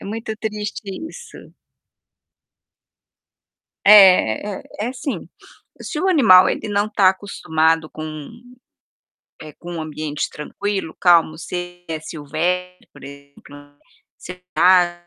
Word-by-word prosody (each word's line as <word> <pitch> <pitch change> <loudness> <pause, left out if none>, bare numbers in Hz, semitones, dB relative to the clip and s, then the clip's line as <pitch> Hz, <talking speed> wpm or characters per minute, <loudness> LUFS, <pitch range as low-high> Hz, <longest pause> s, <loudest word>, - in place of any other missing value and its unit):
É - - -12
muito 220 +2 -5
triste 210 -1 -5 0.3
isso. 480 +7 -12 2.5
É, 190 - +7 0.2
é - - -17 0.2
é 215 - -1
assim, 260 +2 -6 0.5
se 305 - -5
o 380 - 0
animal, 220 - +6
ele - - -3
não 205 +1 0
tá 195 -3 +4
acostumado 160 -5 -1
com, 155 -2 -8 1.1
eh, 155 -1 -11
com 175 0 -9
um 165 - -5
ambiente 155 -1 -4
tranquilo, 190 +3 -5
calmo, 170 -3 +4
se - - -8
ele 175 0 -8
é 160 -1 -4
silvestre, 170 +4 -4
por 145 - -15
exemplo, 140 +1 -15 0.4
sei 180 0 -11 0.2
lá, 180 +2 +6
eh, 175 0 -26
175 Hz, 125 wpm, -20 LUFS, 155-205 Hz, 2.5 s, É